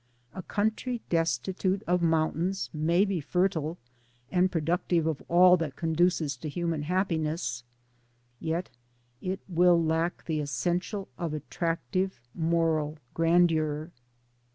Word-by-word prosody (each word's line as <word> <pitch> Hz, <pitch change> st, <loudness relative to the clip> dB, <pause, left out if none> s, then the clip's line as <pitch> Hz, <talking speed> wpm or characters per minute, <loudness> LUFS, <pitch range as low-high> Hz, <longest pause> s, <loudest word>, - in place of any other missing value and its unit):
A 190 Hz, -, -5 dB
country 220 Hz, +6 st, -1 dB
destitute 175 Hz, -, 0 dB
of 180 Hz, 0 st, +1 dB
mountains 165 Hz, +3 st, 0 dB
may 170 Hz, +5 st, +3 dB
be 195 Hz, -5 st, -1 dB
fertile 170 Hz, 0 st, 0 dB, 0.5 s
and 185 Hz, 0 st, +3 dB
productive 170 Hz, +1 st, +1 dB
of 160 Hz, -3 st, -1 dB
all 180 Hz, +1 st, +7 dB
that 155 Hz, -6 st, -3 dB
conduces 165 Hz, -3 st, +1 dB
to 155 Hz, -, -5 dB
human 165 Hz, -1 st, -2 dB
happiness, 160 Hz, -, -1 dB, 0.8 s
yet 165 Hz, +2 st, -2 dB, 0.5 s
it 190 Hz, +1 st, -3 dB
will 175 Hz, -1 st, +4 dB
lack 165 Hz, +1 st, 0 dB
the 155 Hz, -2 st, -1 dB
es 145 Hz, -1 st, -4 dB
sential 180 Hz, -, -1 dB
of 165 Hz, -3 st, -2 dB
attractive 165 Hz, +2 st, -2 dB
moral 160 Hz, -2 st, +1 dB, 0.2 s
grandeur. 165 Hz, -2 st, +2 dB
170 Hz, 115 wpm, -28 LUFS, 155-180 Hz, 0.8 s, all